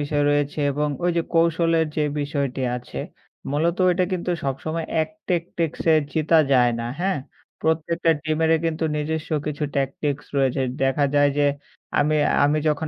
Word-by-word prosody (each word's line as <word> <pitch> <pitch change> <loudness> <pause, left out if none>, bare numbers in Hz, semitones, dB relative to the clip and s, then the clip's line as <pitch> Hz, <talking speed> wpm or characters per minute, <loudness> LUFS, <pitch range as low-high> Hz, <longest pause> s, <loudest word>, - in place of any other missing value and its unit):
বিষয় 145 0 0
রয়েছে 145 +1 0
এবং 150 +2 0 0.2
ওই 175 - +3
যে 170 - +2
কৌশলের 165 -1 +3
যে 155 - +2 0.2
বিষয়টি 140 -3 -2
আছে 125 - -8 0.5
মূলত 165 +4 +1
ওইটা 180 0 +2
কিন্তু 180 0 -2
সবসময় 155 +4 -3 0.2
এক 155 - -4 0.2
টেক 175 -2 +2 0.2
টেক্সে 165 0 +1 0.2
জিতা 160 +1 +3
যায় 125 -2 +5
না। - - -3 0.2
হ্যাঁ? 190 -3 0 0.4
প্রত্যেকটা 165 +1 +1
টিমেরে 160 +1 +2
কিন্তু 160 0 -1
নিজস্ব 160 +2 -3 0.2
কিছু 150 0 -2
ট্যাকটিক্স 140 +1 -1
রয়েছে। 135 0 +2 0.2
দেখা 135 +2 +2
যায় 145 0 +4
যে 145 - +4 0.5
আমি 150 +1 +3 0.3
আমি 150 +2 +2
যখন 150 +1 0
155 Hz, 155 wpm, -23 LUFS, 145-165 Hz, 0.5 s, যায়